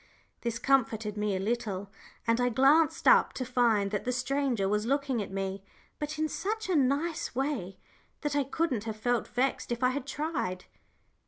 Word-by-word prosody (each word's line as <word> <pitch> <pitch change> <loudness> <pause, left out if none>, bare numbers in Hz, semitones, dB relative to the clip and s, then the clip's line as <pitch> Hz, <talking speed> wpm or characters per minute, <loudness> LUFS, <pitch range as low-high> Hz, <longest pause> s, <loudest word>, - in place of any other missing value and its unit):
This 235 -1 -2
comforted 225 -5 +1
me 210 -1 0
a - - -1
little, 205 -2 -2 0.3
and 230 +1 +2
I 245 - +3
glanced 275 +7 +4
up, - - +6
to 255 - -3
find 230 -5 +2
that 210 - -1
the 250 - -1
stranger 255 -4 0
was 210 +2 0
looking 275 -3 0
at 200 - -5
me, 195 0 -3 0.4
but 300 0 -4
in 310 0 +1
such 435 +6 -3
a 365 - +2
nice 290 +2 0
way 260 -9 -2 0.4
that 295 -2 -1
I 285 - +3
couldn't 270 -5 -1
have 220 -1 -4
felt 240 +1 0
vexed 250 0 -1
if 240 +1 -2
I 250 - +5
had 275 0 -4
tried. 280 - -3
245 Hz, 180 wpm, -29 LUFS, 210-280 Hz, 0.4 s, up